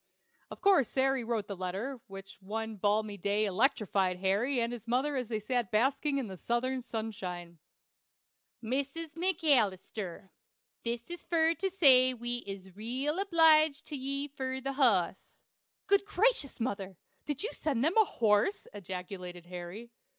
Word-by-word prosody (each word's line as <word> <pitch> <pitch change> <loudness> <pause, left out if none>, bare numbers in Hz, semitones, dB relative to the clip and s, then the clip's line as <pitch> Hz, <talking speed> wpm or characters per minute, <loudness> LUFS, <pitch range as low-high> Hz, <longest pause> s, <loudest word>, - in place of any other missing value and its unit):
Of - - -10
course 380 - +5
Sary 270 -1 +1
wrote 225 -3 -2
the 200 - -6
letter, 195 +8 -4
which 195 0 -11
one 220 +3 -4
balmy 205 +1 0
day 205 +2 +1
electrified 200 -4 +1
Harry 205 +8 +1
and 235 +1 0
his 235 -1 -8
mother 265 +5 +1
as 250 -3 -2
they 220 -1 -2
sat 240 0 -1
basking 275 +6 +1
in 220 -8 -4
Southern 255 +5 -1
sunshine: 190 -8 -5 1.0
"MIS 265 +4 -1 0.2
MACALLISTUR: 220 - 0 0.5
This 235 0 -2
is 345 0 -8
fur 330 -1 +2
to 385 +3 -2
say 260 -8 +6
wee 240 +1 -2
is 190 -2 -8
reel 260 - -2
obliged 315 -5 +4
to 300 - -4
ye 275 +1 -2
fur 265 -2 -4
the 275 +1 -3
HOSS." 205 -10 +1 0.5
"Good 400 0 +3
gracious, 410 - +1
mother! 195 -6 -3 0.3
Did 295 +1 -2
you 450 - -2
send 270 -6 -1
them 325 - +2
a 440 - +7
horse?" 220 - +1
ejaculated 180 -2 -7
Harry. 180 +6 -8
235 Hz, 145 wpm, -31 LUFS, 200-280 Hz, 1.0 s, a